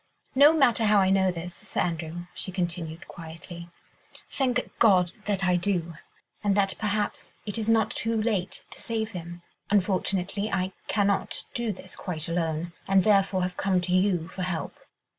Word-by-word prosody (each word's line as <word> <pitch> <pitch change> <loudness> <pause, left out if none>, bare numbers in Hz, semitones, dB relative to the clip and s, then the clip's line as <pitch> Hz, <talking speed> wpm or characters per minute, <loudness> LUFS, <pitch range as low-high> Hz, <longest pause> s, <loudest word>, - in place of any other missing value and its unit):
"No 285 +3 +8
matter 255 -8 +4
how 210 0 +5
I 190 -1 +4
know 190 -1 +4
this, 175 0 -6
Sir - - -5
Andrew," 170 0 -3
she 185 - -4
continued 170 -3 -3
quietly, 170 +1 -9 0.6
"thank 250 -2 0
God 185 -6 +5
that 195 -2 0
I 180 -1 +3
do, 175 -2 -1 0.5
and 205 -1 +2
that 195 -1 +3
perhaps 210 -1 -1
it 210 +1 -1
is 220 0 0
not 225 -2 +3
too 225 0 0
late 210 -4 -1
to - - -8
save 220 -1 -2
him. 175 -2 -8 0.3
Unfortunately, 195 +1 0
I 190 -1 0 0.2
cannot 200 -2 +1
do 235 -2 -1
this 190 -1 -8
quite 165 -5 -4
alone, 165 0 -1
and 195 -1 +4
therefore 195 -2 +3
have 180 0 -3
come 190 -1 +2
to 180 0 -1
you 185 -3 +2
for 185 - -7
help." 180 -3 -3
190 Hz, 165 wpm, -27 LUFS, 175-210 Hz, 0.6 s, No